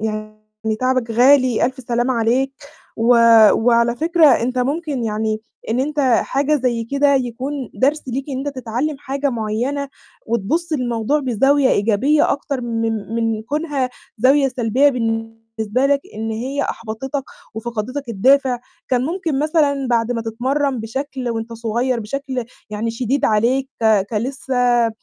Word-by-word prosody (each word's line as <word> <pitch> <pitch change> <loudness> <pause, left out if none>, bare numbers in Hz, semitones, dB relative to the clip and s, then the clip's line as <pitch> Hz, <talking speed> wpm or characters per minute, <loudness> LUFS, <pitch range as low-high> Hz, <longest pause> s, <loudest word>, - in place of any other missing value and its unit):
يعني 215 0 -5
تعبك 255 -2 0
غالي، 255 +1 +4
ألف 260 +2 -5
سلامة 240 +1 -1
عليك، 245 +4 +1 0.4
و 225 +1 0 0.4
وعلى 235 0 +2
فكرة 330 +2 +4
أنت 255 -2 +2
ممكن 280 0 -1
يعني 215 0 -1 0.3
إن 240 - +1
أنت 295 +2 -1
حاجة 275 +3 +2
زي 240 -3 -1
كده 280 +3 +2
يكون 260 +1 -3
درس 290 +4 +1
ليك 260 +2 -3
إن 265 - -3
أنت 280 -2 -4
تتعلّم 255 +5 -2
حاجة 280 0 -2
معيّنة، 240 +5 -2 0.4
وتبُصّ 235 - -1
للموضوع 250 +1 0
بزاوية 270 +2 +2
إيجابية 230 +9 +2
أكتر 275 -1 -3
من 225 -2 -2
من 225 -1 -1
كونها 285 0 -2 0.3
زاوية 270 +4 +4
سلبية 250 +2 +2
بالنسبة 225 -1 -2
لك، 280 0 +2
إن 220 +1 -4
هي 260 +6 -2
أحبطتك 250 +6 -4 0.3
وفَقَدتك 235 +4 -4
الدافع، 255 +4 +3 0.3
كان 250 -1 +1
ممكن 330 -2 -2
مثلًا 290 -2 +1
بعد 235 0 +1
ما 230 -1 -3
تتمرّن 260 +4 -1
بشكل 260 +3 -4
وأنت 230 0 -4
صغيّر 235 +2 -1
بشكل 260 +3 -4 0.3
يعني 215 +2 -2
شديد 250 +4 -1
عليك، 245 +5 +2
ك 215 -3 +3
كلسّه 245 0 +1
250 Hz, 135 wpm, -19 LUFS, 225-275 Hz, 0.4 s, غالي